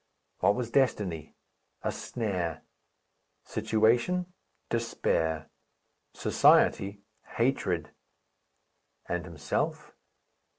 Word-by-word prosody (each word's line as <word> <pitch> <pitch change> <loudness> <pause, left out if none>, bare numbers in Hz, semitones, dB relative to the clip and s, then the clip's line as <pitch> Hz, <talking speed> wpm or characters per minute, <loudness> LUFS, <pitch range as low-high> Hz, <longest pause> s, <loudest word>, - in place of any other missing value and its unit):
What 100 - +4
was 120 -2 -3
destiny? 105 - 0 0.5
A - - 0
snare. 95 -9 -3 0.8
Situation? 125 +12 +1 0.3
Despair. 80 -9 -1 0.6
Society? 100 +1 +4 0.3
Hatred. 95 - 0 1.2
And 90 0 -2
himself? 85 -4 -3
105 Hz, 60 wpm, -29 LUFS, 85-120 Hz, 1.2 s, What